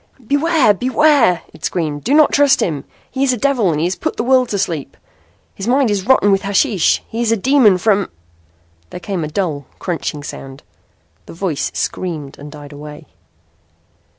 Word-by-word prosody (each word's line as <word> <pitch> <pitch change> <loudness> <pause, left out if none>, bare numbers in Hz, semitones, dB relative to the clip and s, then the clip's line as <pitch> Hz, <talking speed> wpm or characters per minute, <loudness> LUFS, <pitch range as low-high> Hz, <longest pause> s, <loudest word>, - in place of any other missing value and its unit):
"Beware! 285 -3 +3
Beware!" 255 - +2
it - - -17
screamed. 150 -4 -2
"Do 275 +6 +1
not 310 -1 +5
trust 285 -1 +4
him. 150 -6 -2 0.3
He 265 +1 -1
is 265 -2 +2
a - - -2
devil 245 -7 +1
and 150 - -1
has 175 +3 0
put - - -4
the - - -1
world 255 0 +2
asleep. 165 -9 -3 0.6
His 195 - -7
mind 255 -2 +2
is 200 0 -2
rotten 255 -6 +4
with 195 0 +2
hashish. 200 - +1
He 230 +1 -4
is 230 -2 +1
a 230 - +2
demon 240 -4 +4
from 200 0 +1 0.4
" 85 0 -38
Then - - -8
came 190 -4 -3
a - - -3
dull, 150 -5 -3
crunching 165 -4 -4
sound. 135 -1 -9 0.6
The - - -10
voice 165 -4 -2
screamed 155 -6 -4
and 145 +1 -10
died 145 -1 -11
away. 150 +1 -10
195 Hz, 180 wpm, -17 LUFS, 150-250 Hz, 0.6 s, not